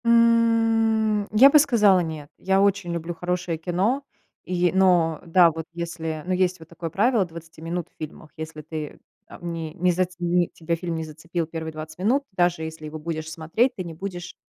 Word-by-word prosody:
М. 225 -2 +3
Я 240 +6 +8
бы 300 - +7
сказала: 215 -10 +5
"Нет". 155 -3 -6
Я 190 +1 +2
очень 200 -3 +1
люблю 170 0 -3
хорошее 175 -1 -2
кино, 190 - 0 0.4
и 180 -1 +1
но 175 -4 +3
да, 170 0 +5
вот 160 0 -6
если, 165 -2 -4
ну, 185 - -1
есть 185 -1 +1
вот 160 - -13
такое 170 0 -6
правило 215 +3 +2
20 165 -1 -12
минут 170 +1 -3
в - - -41
фильмах. 155 0 -9
Если 155 -1 -6
ты 155 -1 -6 0.3
там 170 -1 -7
не 160 -2 -5
не 180 0 +2
зац 180 0 -1
не 175 0 +2
тебя 165 0 -2
фильм 170 0 -4
не 160 - -3
зацепил 165 +2 -4
первые 160 0 -5
20 155 +1 -9
минут, 245 +9 +2
даже 175 -3 +1
если 160 -1 -7
его 155 +1 -6
будешь 160 0 -4
смотреть, 165 +11 0
ты 185 - -4
не 170 -2 -7
будешь 175 +1 -7
175 Hz, 190 wpm, -24 LUFS, 160-195 Hz, 0.4 s, Я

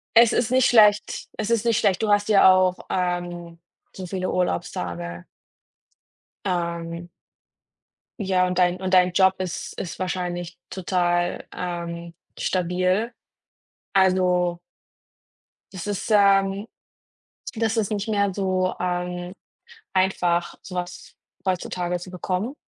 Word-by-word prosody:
Es 235 0 +7
ist 240 -1 +1
nicht 255 0 +4
schlecht, 210 -3 +4
es 220 0 -2
ist 230 -1 +1
nicht 230 -2 +3
schlecht. 190 -3 +2
Du 220 - 0
hast 205 +1 +3
ja 195 -2 +7
auch, 185 -1 +2
ähm, 175 -2 -3 0.3
so 185 - -7
viele 185 +1 -2
Urlaubstage. 85 - -3 1.2
Ähm 170 -2 -3 1.1
Ja, 185 -3 +2
und 180 - -3
dein 180 -1 +3
und 185 0 +1
dein 180 0 +5
Job 190 +1 +4
ist 185 -3 -5
ist 175 - -6
wahrscheinlich 175 -1 -3
total, 175 -1 0
ähm, 170 -1 -5 0.2
stabil. 185 +5 0 0.8
Also 180 -2 +3 1.1
Das 185 -1 -6
ist, 205 +1 -3
ähm, 195 0 +4 0.9
das 225 0 0
ist 215 -3 +1
nicht 205 +1 -2
mehr 200 -2 +1
so, 185 -1 0
ähm, 180 0 -3 0.6
einfach, 180 -2 +1
sowas 180 -1 -6 0.3
heutzutage 180 -1 -1
zu 180 +1 -10
bekommen. 185 +7 -3
185 Hz, 115 wpm, -24 LUFS, 175-195 Hz, 1.2 s, Es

